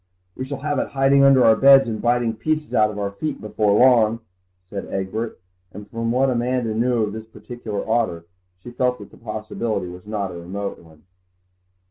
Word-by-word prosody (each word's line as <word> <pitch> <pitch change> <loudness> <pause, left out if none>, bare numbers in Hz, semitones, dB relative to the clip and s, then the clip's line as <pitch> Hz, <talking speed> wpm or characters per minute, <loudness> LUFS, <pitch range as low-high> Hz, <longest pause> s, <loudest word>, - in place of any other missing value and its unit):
"We 130 - -5
shall 135 0 -6
have 145 -2 -1
it - - -1
hiding 135 0 +3
under 135 -2 +6
our 110 -1 +6
beds 135 +1 +6
and 110 -2 -4
biting 120 -1 +1
pieces 155 +5 -2
out 105 -1 +4
of 105 - -7
our 100 -1 -2
feet 150 +10 -4
before 105 -1 0
long," 115 -3 +4 0.5
said 100 +1 -6
Egbert, 100 +4 -4 0.3
and 105 +1 -10
from 115 +2 -3
what 130 +2 +2
Amanda 120 -1 -1
knew 120 +1 +1
of 105 -1 -3
this 110 0 -8
particular 110 -3 -7
otter 110 -8 0 0.4
she 120 - -9
felt 125 0 0
that - - -12
the - - -16
possibility 110 -3 -4
was 90 +3 -12
not 100 -3 -3
a 85 - -8
remote 100 +4 -5
one. 80 -2 -19
115 Hz, 190 wpm, -22 LUFS, 105-125 Hz, 0.5 s, under